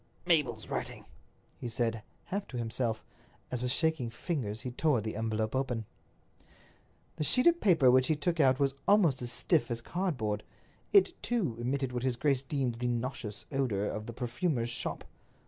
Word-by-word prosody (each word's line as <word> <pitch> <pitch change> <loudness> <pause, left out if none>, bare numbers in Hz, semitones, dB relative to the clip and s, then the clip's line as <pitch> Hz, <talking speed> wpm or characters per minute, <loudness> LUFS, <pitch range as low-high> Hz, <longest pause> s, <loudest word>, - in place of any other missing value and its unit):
"Mabel's 140 -11 +2
writing," - - -4 0.5
he 120 - -4
said, 115 -1 -1 0.2
half 200 +1 -4
to 125 - -6
himself, 115 -1 -2 0.5
as, 125 - -2
with 125 - -1
shaking 160 -4 +1
fingers, 115 - -3
he 125 - -4
tore 140 0 +2
the 110 +1 -4
envelope 110 +1 -1
open. 125 -4 -1 1.3
The - - 0
sheet 250 - +4
of 345 0 +5
paper 160 -10 +5
which 130 0 +4
he 155 - +2
took 165 +3 -1
out 130 -2 +4
was 140 -1 +2
almost 180 -11 +4
as 120 -1 -3
stiff 120 0 +1
as 120 -1 -2
cardboard. 120 - -2 0.5
It, 390 -3 +6
too, 210 - 0
emitted 130 +2 -1
what 125 -1 -2
his 130 -1 0
grace 135 +1 +2
deemed 135 -4 -2
the 125 - 0
nauseous 120 -3 -3
odors 120 -8 0
of 105 0 -6
the 120 - -6
perfumer's 120 +1 -1
shop. - - -3
125 Hz, 170 wpm, -31 LUFS, 115-150 Hz, 1.3 s, It